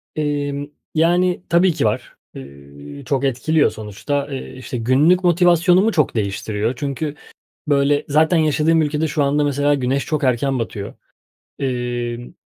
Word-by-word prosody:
Emm, 145 -1 -2 0.3
yani, 175 +3 +2
tabii 175 0 +3
ki - - -1
var. - - -2 0.2
Eee, 70 +1 -11
çok 140 -1 -1
etkiliyor 145 +4 +1
sonuçta, 140 +7 -4
eee, 135 - -6
işte, 125 -1 -6
günlük 145 +10 +3
motivasyonumu 175 +4 +4
çok 150 -8 +1
değiştiriyor. 105 +2 -2
Çünkü, 145 +3 -4 0.5
böyle, 145 0 +2
zaten 160 +4 +3
yaşadığım 160 +1 +2
ülkede 150 +1 0
şu 145 -1 0
anda 145 +1 +1
mesela 145 0 +1
güneş 135 0 -1
çok 155 -3 -2
erken 130 +1 +1
batıyor. 105 -3 -5 0.7
Emm, 120 -2 -3
145 Hz, 135 wpm, -19 LUFS, 120-155 Hz, 0.7 s, motivasyonumu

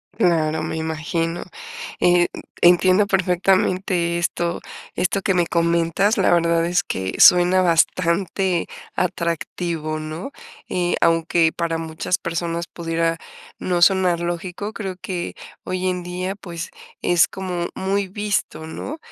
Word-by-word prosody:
Claro, 160 -6 +1
me 160 - -3
imagino. 165 +2 -2 0.6
Eh, 175 0 +4 0.3
entiendo 185 +3 +5
perfectamente 185 -2 +1
esto 170 0 -1 0.3
esto 185 +2 0
que 195 - +1
me 175 -1 +3
comentas, 170 +5 +1
la 195 - +3
verdad 170 -1 +2
es 175 0 +1
que 95 0 -3
suena 180 +1 +7
bastante 175 +1 +1 0.3
atractivo, 170 -2 -2
¿no? 155 - -6 0.4
Eh, 175 -1 0
aunque 165 0 +3
para 165 -1 -1
muchas 165 +3 -2
personas 170 -1 -3
pudiera 165 0 -1 0.4
no 175 -1 -1
sonar 185 -2 +4
lógico, 175 +4 -4
creo 195 -4 -5
que, 180 -2 -4 0.3
hoy 185 0 -2
en 180 -1 -1
día, 180 +2 -4
pues, 170 -4 -7 0.3
es 175 -2 +4
como 180 -2 -4
muy 195 +1 -1
visto, 200 -4 -2
¿no?, 265 - -6
175 Hz, 120 wpm, -21 LUFS, 165-185 Hz, 0.6 s, suena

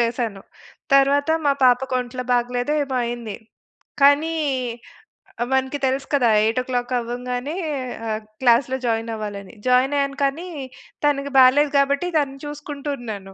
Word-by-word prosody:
చేశాను. 230 -4 -1 0.5
తరువాత 280 +2 +4 0.2
మా 280 - +5
పాపకొంట్లో 250 0 +1
బాగాలేదో 245 +3 0
ఏమో 265 -2 -3
అయింది. 235 -3 -5 0.7
కానీ 290 +4 +5 1.2
మనకు 265 +2 0
తెలుసు 265 +1 -1
కదా! 250 -4 +3
8 225 +3 +1
ఓ - - -6
క్లాక్ 245 0 -1
అవ్వంగానే 245 +4 -4 0.5
ఆహ్, 215 0 -2 0.2
క్లాస్‌లో 255 +1 +3
జాయిన్ 225 0 -1
అవ్వాలని. 205 -1 -7
జాయిన్ 255 +3 +3
అయ్యాను 275 0 -1
కానీ 305 +6 -2 0.6
తనకి 280 -1 +1
బాలేదు 275 +3 +5
గాబట్టి 280 +5 +2
తనని 275 -2 -1
చూసుకుంటూ 295 0 -6
ఉన్నాను. 200 -5 -7
255 Hz, 125 wpm, -22 LUFS, 240-280 Hz, 1.2 s, మా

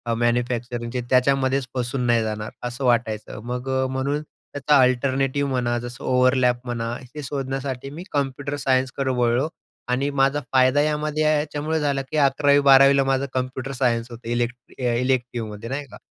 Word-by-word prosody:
मॅन्युफॅक्चरिंगचे 120 +1 -1
त्याच्यामध्येच 130 +1 +2
फसून 125 +1 -2
नाही 120 -1 +3
जाणार 110 0 -4 0.2
असं 125 +3 -6
वाटायचं, 115 -4 0
मग 125 +2 -4
अ, - - 0
म्हणून 140 +3 -1 0.3
त्याचा 145 +1 +3
अल्टरनेटिव्ह 135 +2 +1
म्हणा, 120 -2 0
जसं 120 0 -8
ओव्हरलॅप 125 -1 +3
म्हणा, 115 -2 -3 0.2
हे 150 - -5
शोधण्यासाठी 135 -1 -4
मी 155 +5 -8
कम्प्युटर 140 0 -2
सायन्सकडं 130 0 0
वळलो. 120 +3 +2 0.4
आणि 130 +3 +1
माझा 140 +1 +2
फायदा 130 +2 +4
यामध्ये 150 0 0
याच्यामुळे 155 +1 0
झाला, 140 -2 0
की 135 +3 -5
11वी-12वी 140 -1 +5
ला 135 - +4
माझं 135 0 +1
कम्प्युटर 130 +1 -3
सायन्स 120 -1 +1
होतं, 120 0 -10
इलेक्ट 120 0 0 0.2
अ, 125 -2 0
इलेक्टिव्हमध्ये 120 -3 -2
नाही 140 +2 -3
का. 105 - -10
130 Hz, 150 wpm, -23 LUFS, 120-140 Hz, 0.4 s, 11वी-12वी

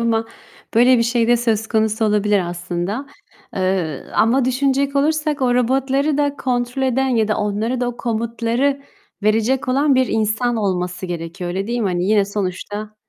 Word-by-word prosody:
ama 225 -1 0 0.5
böyle 245 +2 +5
bir - - +3
şey 235 0 +1
de 240 - +5
söz 225 -2 0
konusu 220 0 +1
olabilir 210 -1 +2
aslında. 175 +8 -4 0.5
Eee, 185 -6 -1
ama 245 +4 +3
düşünecek 275 +2 +1
olursak 305 0 +1
o 245 -1 +2
robotları 270 +4 +1
da 285 -1 0
kontrol 250 0 -2
eden 265 +1 +1
ya 225 -4 +1
da 215 - +1
onlara 215 +4 -1
da 245 - 0
o 245 - -6
komutları 235 +4 -1 0.4
verecek 225 +5 +1
olan 275 +2 +3
bir 255 0 +3
insan 220 +2 0
olması 180 -3 -2
gerekiyor 175 +1 -5
öyle, 190 +2 -3
değil 240 +1 -2
mi? 210 - +1
Hani, 175 -1 -1
yine 205 0 +3
sonuçta 205 +2 -4
230 Hz, 165 wpm, -19 LUFS, 205-255 Hz, 0.5 s, böyle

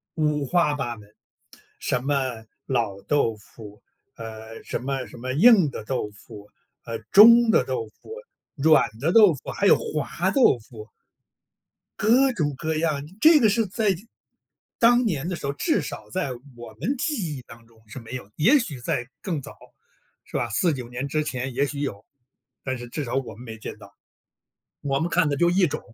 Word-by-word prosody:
五 150 -3 0
花 160 +1 +2
八 120 -5 -4
门， 105 -1 -15 0.7
什 125 - -1
么 145 - 0 0.5
老 115 -7 -2
豆 130 -7 +1
腐， 105 -1 -14 0.3
呃， 110 0 -9
什 - - -3
么 135 0 -3
什 - - -13
么 130 +2 -5
硬 190 - +6
的 110 - -7
豆 125 -3 -2
腐， 105 0 -14 0.3
呃， 115 -1 -5
中 230 +3 +8
的 210 - +4
豆 125 -3 -3
腐， 110 - -17 0.4
软 155 +1 +4
的 160 +7 0
豆 210 -6 +7
腐， 140 - -9
还 200 - -2
有 - - +6
滑 155 +4 -2
豆 250 - +4
腐。 110 -1 -13 1.1
各 255 +5 +4
种 150 - -1
各 160 +3 -2
样， 155 -3 0 0.2
这 315 0 +7
个 225 -6 +4
是 225 +2 +1
在 205 0 0 0.8
当 240 +1 +5
年 165 - -2
的 180 - -3
时 - - -11
候， 140 - -1
至 310 - 0
少 - - -8
在 180 -8 -2 0.2
我 120 -2 -11
们 255 - -1
记 220 - -2
忆 130 - -9
当 115 -1 -15
中 115 -1 -24
是 110 - -9
没 115 +2 -10
有。 115 -6 -7
也 235 - +5
许 155 - -5
在 120 0 -2
更 165 -7 -3
早， - - -11 0.7
是 - - -21
吧， - - 0
49 125 - -1
年 125 +3 -5
之 155 +2 0
前 130 -2 -4
也 140 +4 +1
许 140 0 -6
有， 115 -9 -5 0.6
但 130 -1 -3
是 120 0 -9
至 145 +5 -4
少 120 - -3
我 135 -6 -3
们 120 - -12
没 110 -2 -9
见 110 - -7
到。 100 -2 -16 0.9
我 135 -1 -1
们 165 - -1
看 170 -2 +2
的 145 - -1
就 170 +4 +3
一 180 0 +3
种 150 +1 -4
140 Hz, 200 characters per minute, -24 LUFS, 120-180 Hz, 1.1 s, 中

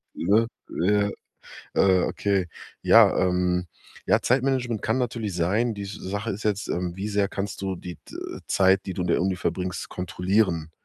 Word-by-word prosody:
ne? 110 +6 +3 0.2
Ja. 100 +3 +1 0.7
Äh, 95 -2 +4
okay, 100 -3 0 0.4
ja, - - +7
ähm 90 -1 +1 0.4
ja, - - +4
Zeitmanagement 125 -3 +1
kann 110 +4 0
natürlich 115 -6 -2
sein. 105 +7 +1
Die 100 0 -5
Sache 100 +2 -4
ist 100 +3 -6
jetzt, 105 -1 -1
ähm, 90 0 -2
wie 100 +2 -4
sehr 100 -1 +1
kannst 100 0 -5
du 95 -1 -2
die, 90 -2 -8
äh, - - -7
Zeit, 95 0 +3
die 95 - -3
du 90 - -2
in - - -2
der - - +2
Uni 95 0 +1
verbringst, 90 +1 -3
kontrollieren, 90 -2 0
95 Hz, 165 wpm, -25 LUFS, 90-105 Hz, 0.7 s, ja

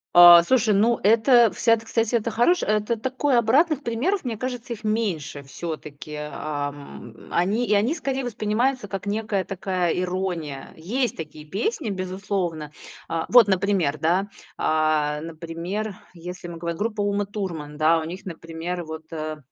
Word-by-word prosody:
А, 175 -1 +11
слушай, 225 0 +3
ну 225 +4 +3
это, 230 +2 +5
вся 230 - +3
это, 225 0 -1
кстати, 230 +1 0
это 230 0 0
хорош 295 +12 +3
э, - - -1
это 215 +2 +1
такой 260 +3 0
обратных 280 +6 +3
примеров, 280 - -1
мне 235 -5 -3
кажется, 245 -1 -4
их 220 -1 -11
меньше 185 -10 -2
всё-таки. 150 0 -7 0.2
Ам. 145 -5 -6 0.2
Они 205 +8 +1
и - - +2
они 215 +9 +3
скорее 270 -4 -2
воспринимаются 240 +1 -1
как 195 0 -5
некая 205 -2 -1
такая 185 -2 -1
ирония. 180 -6 -3
Есть 230 +8 -2
такие 155 -1 -8
песни, 215 +6 -2
безусловно. 185 -5 -3 0.4
А. 165 -1 -1
Вот, 240 -3 +7
например, 185 -6 +1
да. 180 +6 +1 0.3
А, 155 -1 +1
например, 170 +6 -5 0.2
если 175 +1 -8
в - - -7
мы 170 - -8
гов 170 0 -3
группа 210 +3 -2
"Ума 205 0 0
Турман"- 170 -8 -5
да, 160 +2 +4
у - - -4
них, 185 +4 -7
например, 170 0 -5
вот, 160 0 -7
э, 155 -1 -4
195 Hz, 160 wpm, -24 LUFS, 165-225 Hz, 0.4 s, А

